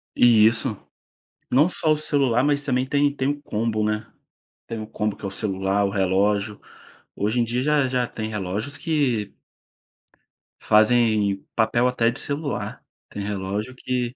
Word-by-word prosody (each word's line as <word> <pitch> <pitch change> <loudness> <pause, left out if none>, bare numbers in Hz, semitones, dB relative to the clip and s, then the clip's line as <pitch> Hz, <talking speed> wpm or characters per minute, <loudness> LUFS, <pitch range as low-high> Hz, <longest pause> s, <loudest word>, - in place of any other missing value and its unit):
E 115 -3 +6
isso, 115 0 +2 0.7
não 145 +7 +4
só 155 -3 +1
o - - +1
celular 135 -5 +1
mas 145 0 +1
também 130 -2 +1
tem 145 +1 +1
tem 130 0 0
o 145 0 -3
combo, 110 -4 -1
né. 110 0 -1 0.6
Tem 115 - -5
o 110 - -7
combo 105 -2 -2
que - - -19
é - - -1
o 95 - -6
celular, 95 -1 0
o - - 0
relógio. 100 +1 +1 0.6
Hoje 110 +4 0
em - - +2
dia 120 +2 -1
já 150 -2 +2
já 125 -1 0
tem 110 -1 -5
relógios 105 +6 -4
que 135 -9 -1 1.3
fazem 110 -3 +3
papel 120 +2 +2
até 120 -2 +2
de 125 - -3
celular. 145 -1 -4 0.3
Tem 105 - -6
relógio 100 +4 -4
que 125 -1 -3
115 Hz, 160 wpm, -23 LUFS, 105-130 Hz, 1.3 s, E